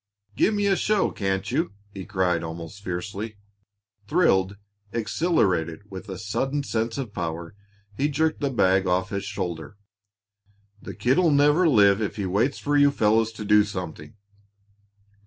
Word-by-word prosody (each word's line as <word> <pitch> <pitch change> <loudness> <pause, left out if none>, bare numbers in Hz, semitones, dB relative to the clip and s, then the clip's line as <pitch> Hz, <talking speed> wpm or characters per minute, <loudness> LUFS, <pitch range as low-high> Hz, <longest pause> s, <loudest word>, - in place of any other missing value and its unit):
"Give - - +3
me 205 0 0
a 195 -1 +3
show, 210 +1 +1
can't 95 +1 -2
you?" 155 - -1 0.2
he 95 -2 -7
cried 90 -3 0
almost 85 +4 -7
fiercely. 100 +4 -5 0.7
Thrilled, 100 - +2 0.3
exhilarated 100 - 0
with 95 +2 -8
a 95 - -5
sudden 135 +8 -2
sense 115 -2 -2
of 125 -7 -5
power, 85 -1 -4 0.4
he 140 +5 0
jerked 155 +2 0
the 140 - +1
bag 95 -6 +2
off 90 +1 +1
his 100 -1 -3
shoulder. 90 -2 -5 1.0
"The - - -8
kid'll 145 +8 +3
never 150 +4 +4
live 100 -5 +5
if 105 - -2
he 100 - -3
waits 105 +9 +1
for 145 0 -1
you 145 0 +6
fellows 110 -3 +2
to 110 -1 -7
do 105 0 +5
something." 90 -6 -7
105 Hz, 150 wpm, -25 LUFS, 95-140 Hz, 1.0 s, you